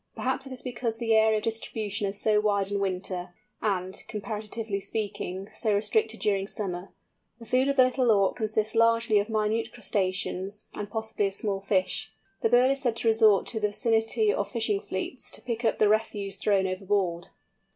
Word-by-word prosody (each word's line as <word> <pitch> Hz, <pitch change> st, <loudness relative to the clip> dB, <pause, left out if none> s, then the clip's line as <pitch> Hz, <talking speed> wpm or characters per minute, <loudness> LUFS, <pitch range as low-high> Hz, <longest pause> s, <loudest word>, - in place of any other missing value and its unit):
Perhaps 260 Hz, +1 st, -2 dB
it -, -, -9 dB
is 260 Hz, -, -6 dB
because 240 Hz, -3 st, -2 dB
the 230 Hz, -1 st, +1 dB
area 220 Hz, 0 st, +4 dB
of 210 Hz, -, -4 dB
distribution 215 Hz, -2 st, -2 dB
is 200 Hz, +1 st, -5 dB
so 215 Hz, -1 st, +3 dB
wide 200 Hz, -2 st, +1 dB
in 200 Hz, -, 0 dB
winter, 185 Hz, -2 st, -3 dB, 0.3 s
and, 190 Hz, -3 st, -1 dB
comparatively 215 Hz, 0 st, -4 dB
speaking, 195 Hz, -2 st, -4 dB
so 215 Hz, -4 st, 0 dB
restricted 220 Hz, +2 st, +1 dB
during 195 Hz, -2 st, 0 dB
summer. 185 Hz, -3 st, -4 dB, 0.5 s
The 230 Hz, -, -12 dB
food 255 Hz, +4 st, +2 dB
of 280 Hz, -, +1 dB
the 260 Hz, -, +7 dB
Little 255 Hz, -1 st, +1 dB
Auk 200 Hz, -3 st, +3 dB
consists 215 Hz, -1 st, 0 dB
largely 230 Hz, -1 st, +4 dB
of 205 Hz, +2 st, -2 dB
minute 220 Hz, +1 st, 0 dB
crustaceans, 195 Hz, -2 st, -1 dB
and 205 Hz, -1 st, -5 dB
possibly 220 Hz, -2 st, -1 dB
of 195 Hz, -, -4 dB
small 200 Hz, -2 st, -2 dB
fish. 195 Hz, 0 st, +1 dB, 0.3 s
The 225 Hz, -, +2 dB
bird 250 Hz, +3 st, +5 dB
is 275 Hz, 0 st, 0 dB
said 240 Hz, -4 st, 0 dB
to 230 Hz, -, -1 dB
resort 220 Hz, -3 st, +5 dB
to 225 Hz, -, -2 dB
the 210 Hz, -, +2 dB
vicinity 225 Hz, 0 st, +2 dB
of 200 Hz, 0 st, -2 dB
fishing 215 Hz, -3 st, 0 dB
fleets, 190 Hz, +7 st, -5 dB
to -, -, -5 dB
pick 235 Hz, -1 st, -3 dB
up 225 Hz, -, +2 dB
the 215 Hz, -, +4 dB
refuse 205 Hz, -2 st, 0 dB
thrown 200 Hz, -1 st, +2 dB
overboard. 185 Hz, -2 st, -1 dB
215 Hz, 185 wpm, -27 LUFS, 195-225 Hz, 0.5 s, the